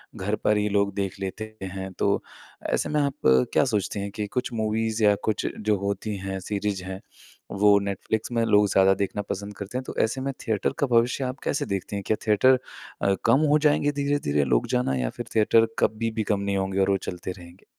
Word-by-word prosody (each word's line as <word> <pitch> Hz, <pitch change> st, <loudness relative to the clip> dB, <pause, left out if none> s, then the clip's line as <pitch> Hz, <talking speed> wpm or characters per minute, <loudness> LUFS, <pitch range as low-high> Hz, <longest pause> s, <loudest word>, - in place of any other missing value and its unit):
घर 105 Hz, +1 st, -1 dB
पर 105 Hz, 0 st, +1 dB
ही 105 Hz, 0 st, +1 dB
लोग 100 Hz, -1 st, +1 dB
देख 100 Hz, -1 st, -3 dB
लेते 110 Hz, +3 st, -5 dB
हैं 95 Hz, 0 st, -5 dB
तो -, -, +2 dB, 0.5 s
ऐसे -, -, 0 dB
में 150 Hz, 0 st, +1 dB
आप 140 Hz, -1 st, 0 dB, 0.4 s
क्या -, -, +4 dB
सोचती 105 Hz, -4 st, -1 dB
हैं 100 Hz, 0 st, -3 dB
कि 105 Hz, 0 st, -4 dB
कुछ 125 Hz, +4 st, -3 dB
मूवीज़ 110 Hz, 0 st, -1 dB
या 105 Hz, -, +6 dB
कुछ 110 Hz, -1 st, -1 dB
जो 105 Hz, -1 st, +1 dB
होती 100 Hz, +1 st, -2 dB
हैं 95 Hz, 0 st, -4 dB
सीरीज़ 100 Hz, -1 st, -3 dB
हैं 95 Hz, +1 st, -6 dB, 0.6 s
वो 105 Hz, -1 st, +7 dB
नेटफ्लिक्स 100 Hz, +3 st, -3 dB
में 115 Hz, -1 st, +1 dB
लोग 105 Hz, -2 st, +4 dB
ज़्यादा 95 Hz, 0 st, +5 dB
देखना 100 Hz, +1 st, -2 dB
पसंद 100 Hz, +1 st, -4 dB
करते 100 Hz, +5 st, -5 dB
हैं, 130 Hz, -, -3 dB
तो -, -, -8 dB
ऐसे 110 Hz, +4 st, -1 dB
में 135 Hz, +1 st, -2 dB
थिएटर 110 Hz, -3 st, +1 dB
का 140 Hz, -, +2 dB
भविष्य 120 Hz, +2 st, +2 dB
आप 130 Hz, +1 st, -4 dB
कैसे 145 Hz, -, -1 dB
देखती 100 Hz, +1 st, -3 dB
हैं? 100 Hz, -, -3 dB
क्या 110 Hz, -, +1 dB
थिएटर 125 Hz, +5 st, +5 dB, 0.4 s
अ, 100 Hz, -, +3 dB
कम 135 Hz, -, +5 dB
हो 150 Hz, -, +5 dB
जाएँगे 145 Hz, 0 st, +2 dB
धीरे-धीरे 140 Hz, -, +1 dB
लोग 60 Hz, -3 st, +1 dB
जाना 125 Hz, -, +1 dB
या 60 Hz, -2 st, -1 dB
फिर 120 Hz, -, -3 dB
थिएटर 115 Hz, +1 st, +4 dB
कभी 115 Hz, +1 st, +1 dB
भी 110 Hz, -1 st, -2 dB
कम 100 Hz, -, 0 dB
नहीं 100 Hz, 0 st, -1 dB
होंगे 95 Hz, 0 st, -1 dB
और 95 Hz, -, +3 dB
वो 100 Hz, -, +3 dB
चलते 90 Hz, +1 st, -5 dB
रहेंगे? 90 Hz, 0 st, -13 dB
105 Hz, 215 wpm, -25 LUFS, 95-115 Hz, 0.6 s, वो